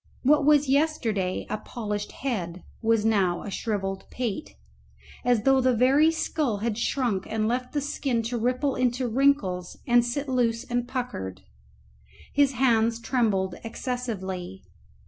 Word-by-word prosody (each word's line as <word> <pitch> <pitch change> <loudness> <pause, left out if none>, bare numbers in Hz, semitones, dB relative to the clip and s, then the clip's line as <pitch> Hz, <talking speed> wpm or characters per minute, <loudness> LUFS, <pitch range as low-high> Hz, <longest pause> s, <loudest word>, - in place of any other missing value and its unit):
What 290 +2 +4
was 295 -1 +5
yesterday 245 -10 0
a 215 - -3
polished 210 -3 -4
head 185 -10 -4 0.2
was 225 -1 +2
now 195 -6 +2
a 205 - -6
shrivelled 195 -3 -3
pate, 235 - -4 0.7
as 245 -3 +2
though 270 0 +4
the 255 -1 +3
very 270 +7 +5
skull 305 -7 -1
had 220 +1 -1
shrunk 235 -4 -1
and 215 0 0
left 250 +2 -2
the 290 - 0
skin 270 -4 -1
to 240 +2 -2
ripple 255 +4 +1
into 250 0 0
wrinkles 225 -8 +1
and 240 -3 +5
sit 275 +4 -2
loose 240 -2 +1
and 245 -2 -2
puckered. 95 - -4 0.9
His 280 -1 +3
hands 230 -3 +2
trembled 215 -7 0
excessively. 195 -7 -4
240 Hz, 140 wpm, -26 LUFS, 210-260 Hz, 0.9 s, was